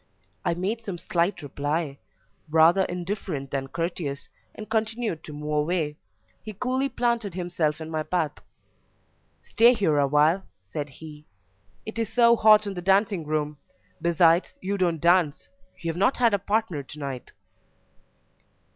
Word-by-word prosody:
I 170 Hz, -, 0 dB
made 200 Hz, +6 st, -2 dB
some 195 Hz, -5 st, -5 dB
slight 170 Hz, +1 st, -1 dB
reply, 145 Hz, +1 st, -3 dB, 0.5 s
rather 165 Hz, +5 st, +5 dB
indifferent 175 Hz, -6 st, -4 dB
than 135 Hz, -1 st, -2 dB
courteous, 165 Hz, -3 st, -3 dB, 0.3 s
and 215 Hz, -, -8 dB
continued 220 Hz, -5 st, -2 dB
to -, -, -8 dB
move 150 Hz, +1 st, -4 dB
away. 150 Hz, 0 st, 0 dB, 0.5 s
He 215 Hz, -, -8 dB
coolly 255 Hz, +5 st, -1 dB
planted 235 Hz, -6 st, -1 dB
himself 175 Hz, -4 st, -1 dB
in 160 Hz, 0 st, -7 dB
my 155 Hz, -1 st, -1 dB
path. 160 Hz, -1 st, -2 dB, 1.0 s
"Stay 240 Hz, +2 st, +5 dB
here 160 Hz, -9 st, +2 dB
awhile," 150 Hz, +6 st, +3 dB, 0.2 s
said 145 Hz, +10 st, -5 dB
he: 150 Hz, +2 st, -12 dB, 0.6 s
"it 220 Hz, +1 st, -6 dB
is 225 Hz, -1 st, -2 dB
so 235 Hz, 0 st, +5 dB
hot 215 Hz, -1 st, +6 dB
in 200 Hz, -, -3 dB
the 180 Hz, -, -5 dB
dancing 195 Hz, -3 st, +2 dB
room; 150 Hz, -1 st, -2 dB, 0.4 s
besides, 170 Hz, +1 st, +3 dB
you 195 Hz, +2 st, -2 dB
don't 175 Hz, -4 st, 0 dB
dance; 170 Hz, -2 st, +2 dB, 0.3 s
you 165 Hz, -, -3 dB
have 165 Hz, -, -8 dB
not 200 Hz, +8 st, +2 dB
had 235 Hz, -3 st, +3 dB
a 200 Hz, -, +2 dB
partner 205 Hz, -6 st, -1 dB
to 140 Hz, +2 st, -11 dB
night." 135 Hz, -4 st, -6 dB
175 Hz, 145 wpm, -26 LUFS, 150-205 Hz, 1.0 s, hot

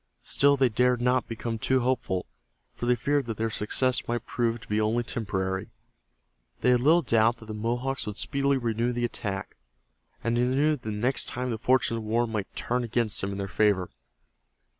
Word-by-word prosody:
Still 140 Hz, 0 st, +3 dB
they 130 Hz, -1 st, +4 dB
dared 125 Hz, +2 st, +2 dB
not 125 Hz, +1 st, +1 dB
become 115 Hz, 0 st, -4 dB
too 130 Hz, +3 st, +2 dB
hopeful, 120 Hz, -7 st, -1 dB, 0.5 s
for 120 Hz, -, -4 dB
they 125 Hz, -, +4 dB
feared 140 Hz, +2 st, 0 dB
that 115 Hz, -, -4 dB
their 115 Hz, 0 st, -1 dB
success 125 Hz, +4 st, 0 dB
might 120 Hz, -1 st, -2 dB
prove 120 Hz, -1 st, -1 dB
to -, -, -13 dB
be 105 Hz, +1 st, +1 dB
only 115 Hz, +3 st, +1 dB
temporary. 95 Hz, -5 st, -3 dB, 0.9 s
They 125 Hz, -, +4 dB
had 125 Hz, -, +4 dB
little 165 Hz, +6 st, +5 dB
doubt 115 Hz, +1 st, +3 dB
that 115 Hz, -, -13 dB
the 110 Hz, -, -6 dB
Mohawks 120 Hz, +4 st, -2 dB
would 105 Hz, 0 st, -5 dB
speedily 140 Hz, -1 st, +1 dB
renew 120 Hz, 0 st, 0 dB
the 120 Hz, 0 st, 0 dB
attack, 100 Hz, -4 st, -4 dB, 0.7 s
and 115 Hz, 0 st, +1 dB
they 120 Hz, -, +2 dB
knew 140 Hz, +5 st, +2 dB
that 115 Hz, -6 st, -6 dB
next 120 Hz, +6 st, 0 dB
time 125 Hz, 0 st, -3 dB
the 110 Hz, -, -3 dB
fortunes 125 Hz, -1 st, +2 dB
of -, -, -7 dB
war 115 Hz, +2 st, +1 dB
might 110 Hz, -4 st, -3 dB, 0.2 s
again 120 Hz, -2 st, 0 dB
turn 100 Hz, 0 st, -1 dB
in 100 Hz, -, -5 dB
their 100 Hz, -1 st, -3 dB
favor. 100 Hz, -2 st, +1 dB
120 Hz, 190 wpm, -27 LUFS, 110-125 Hz, 0.9 s, little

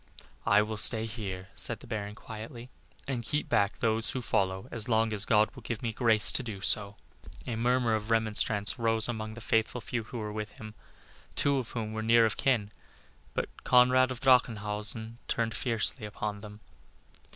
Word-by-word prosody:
"I 105 Hz, +1 st, +5 dB
will 110 Hz, 0 st, -5 dB
stay 110 Hz, +1 st, +3 dB
here," 100 Hz, -4 st, -6 dB
said -, -, +1 dB
the -, -, -14 dB
Baron, 105 Hz, -2 st, -5 dB
quietly, 115 Hz, +3 st, -10 dB, 0.4 s
"and 130 Hz, -3 st, -2 dB
keep 150 Hz, +6 st, -2 dB
back 100 Hz, +1 st, +1 dB
those 110 Hz, 0 st, 0 dB
who 130 Hz, -, -4 dB
follow 95 Hz, -3 st, -1 dB
as 115 Hz, 0 st, -2 dB
long 110 Hz, -1 st, +2 dB
as 105 Hz, 0 st, +4 dB
God 110 Hz, 0 st, +3 dB
will -, -, -12 dB
give 115 Hz, 0 st, -5 dB
me 115 Hz, -2 st, -2 dB
grace 110 Hz, -2 st, +2 dB
so -, -, +6 dB
to -, -, -3 dB
do." 105 Hz, -5 st, -7 dB, 0.8 s
A 120 Hz, -, -4 dB
murmur 120 Hz, 0 st, +1 dB
of 110 Hz, 0 st, -3 dB
remonstrance 110 Hz, -1 st, 0 dB
rose 115 Hz, -1 st, +5 dB
among 110 Hz, -2 st, -5 dB
the 120 Hz, -, -10 dB
faithful 110 Hz, +2 st, 0 dB
few 120 Hz, 0 st, -4 dB
who 120 Hz, -, -8 dB
were 105 Hz, -2 st, -5 dB
with 105 Hz, 0 st, -6 dB
him, 110 Hz, -1 st, -10 dB, 0.6 s
two 140 Hz, -1 st, +1 dB
of 120 Hz, -, -6 dB
whom 110 Hz, -2 st, -4 dB
were 110 Hz, -, -3 dB
near 115 Hz, +1 st, +4 dB
of 110 Hz, -, -1 dB
kin. 115 Hz, -6 st, 0 dB, 0.6 s
But -, -, -2 dB
Conrad 125 Hz, +1 st, +4 dB
of 130 Hz, -2 st, -5 dB
Drachenhausen 110 Hz, -2 st, +1 dB
turned 115 Hz, -1 st, -1 dB
fiercely 115 Hz, -1 st, -1 dB
upon 105 Hz, 0 st, -5 dB
them. 105 Hz, 0 st, -11 dB
110 Hz, 185 wpm, -29 LUFS, 105-120 Hz, 0.8 s, so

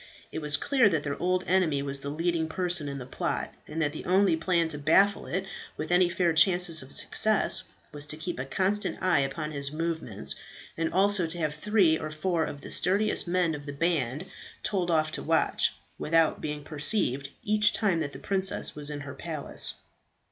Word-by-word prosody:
It -, -, -4 dB
was 150 Hz, -2 st, +3 dB
clear 255 Hz, -, +3 dB
that 155 Hz, -5 st, -1 dB
their 145 Hz, -1 st, -3 dB
old 185 Hz, +1 st, 0 dB
enemy 165 Hz, -7 st, +1 dB
was 140 Hz, 0 st, +2 dB
the 140 Hz, -, -5 dB
leading 165 Hz, +2 st, -1 dB
person 175 Hz, -3 st, 0 dB
in 140 Hz, -, -5 dB
the 125 Hz, -, -7 dB
plot, 130 Hz, -, -3 dB
and 155 Hz, +2 st, -6 dB
that 145 Hz, 0 st, 0 dB
the -, -, -7 dB
only 185 Hz, -1 st, +3 dB
plan 170 Hz, 0 st, +1 dB
to 150 Hz, -, -4 dB
baffle 195 Hz, +7 st, +3 dB
it 190 Hz, +3 st, -3 dB, 0.3 s
with -, -, -5 dB
any 180 Hz, 0 st, +4 dB
fair 175 Hz, -1 st, +1 dB
chances 175 Hz, -1 st, +3 dB
of 130 Hz, +1 st, -13 dB
success 215 Hz, -1 st, +3 dB, 0.3 s
was 145 Hz, 0 st, -4 dB
to 155 Hz, -, -4 dB
keep 170 Hz, -2 st, -5 dB
a 130 Hz, -, -3 dB
constant 195 Hz, +8 st, -1 dB
eye 185 Hz, -5 st, +2 dB
upon 150 Hz, +3 st, -2 dB
his 140 Hz, -1 st, -3 dB
movements, 160 Hz, -9 st, -2 dB, 0.4 s
and 165 Hz, 0 st, -2 dB
also 195 Hz, -1 st, +3 dB
to 170 Hz, +2 st, -3 dB
have 155 Hz, -3 st, -1 dB
three 180 Hz, -1 st, +2 dB
or 155 Hz, -, -5 dB
four 160 Hz, +1 st, -1 dB
of 145 Hz, -, -8 dB
the -, -, -7 dB
sturdiest 200 Hz, +2 st, +2 dB
men 175 Hz, -2 st, +1 dB
of 145 Hz, -1 st, -8 dB
the 145 Hz, -, -5 dB
band 150 Hz, -1 st, -1 dB, 0.4 s
told 185 Hz, -4 st, -1 dB
off 155 Hz, -2 st, +1 dB
to -, -, -4 dB
watch, -, -, +1 dB, 0.2 s
without 165 Hz, 0 st, +2 dB
being 150 Hz, -1 st, -5 dB
perceived, 145 Hz, -, +1 dB
each 210 Hz, 0 st, +3 dB
time 195 Hz, -7 st, 0 dB
that 145 Hz, -3 st, -3 dB
the -, -, -10 dB
princess 195 Hz, -1 st, +1 dB
was 150 Hz, 0 st, -4 dB
in 145 Hz, -1 st, -6 dB
her 140 Hz, -1 st, -8 dB
palace. 155 Hz, -3 st, -1 dB
165 Hz, 200 wpm, -27 LUFS, 150-185 Hz, 0.4 s, any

